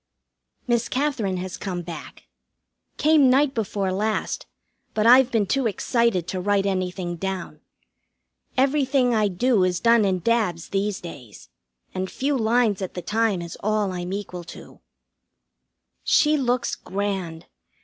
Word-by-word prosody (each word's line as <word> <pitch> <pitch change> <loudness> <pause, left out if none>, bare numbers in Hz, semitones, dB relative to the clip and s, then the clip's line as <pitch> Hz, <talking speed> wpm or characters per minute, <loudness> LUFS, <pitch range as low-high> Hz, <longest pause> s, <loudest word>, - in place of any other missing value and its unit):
Miss 240 -1 0
Katherine 255 -9 -1
has 180 0 -5
come 180 -3 -4
back. 170 -1 -9 0.7
Came 300 -3 +5
night 270 +2 +3
before 200 -4 -2
last, 210 +3 -2 0.5
but 215 - +1
I've 250 +2 +7
been 225 -5 +1
too 265 +4 +1
excited 225 -3 0
to 185 - -3
write 200 +1 +1
anything 185 -2 -2
down. 190 0 -5 1.0
Everything 265 -2 +2
I 215 -2 +3
do 205 +2 +2
is 180 -1 +1
done 230 0 +4
in 190 -2 +1
dabs 180 -4 0
these 200 0 -1
days, 125 - -11 0.4
and 185 0 -3
few 280 +2 -1
lines 225 -3 +2
at 190 - -5
the 180 - -5
time 210 -2 0
is 170 - -8
all 210 -2 0
I'm 180 0 -5
equal 190 -3 -5
to. - - -12 1.2
She 305 0 +4
looks 250 -3 0
grand. 190 -4 -4
205 Hz, 140 wpm, -24 LUFS, 185-240 Hz, 1.2 s, I've